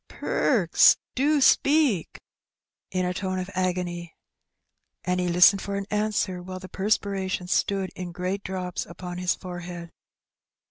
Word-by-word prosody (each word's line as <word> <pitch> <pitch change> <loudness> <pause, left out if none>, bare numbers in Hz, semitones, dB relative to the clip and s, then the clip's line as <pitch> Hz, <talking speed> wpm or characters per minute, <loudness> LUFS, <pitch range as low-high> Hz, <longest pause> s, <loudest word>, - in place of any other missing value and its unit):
"Perks, - - +3 0.2
do 290 +3 +2
speak!" 275 - +3 0.7
in 185 -1 -1
a 180 - -1
tone 185 0 -3
of 185 +1 -4
agony. 175 -2 -2 0.9
And 180 0 0
he 180 - 0
listened 180 +3 +6
for 200 - -4
an 200 0 -3
answer, 210 -3 -1
while 185 +1 -7
the 185 0 -9
perspiration 195 -2 -1
stood 195 +1 0
in 180 -1 -6
great 185 +3 -3
drops 185 -2 -4
upon 180 +1 -7
his 180 0 +1
forehead. 175 -2 -8
185 Hz, 135 wpm, -25 LUFS, 180-200 Hz, 0.9 s, listened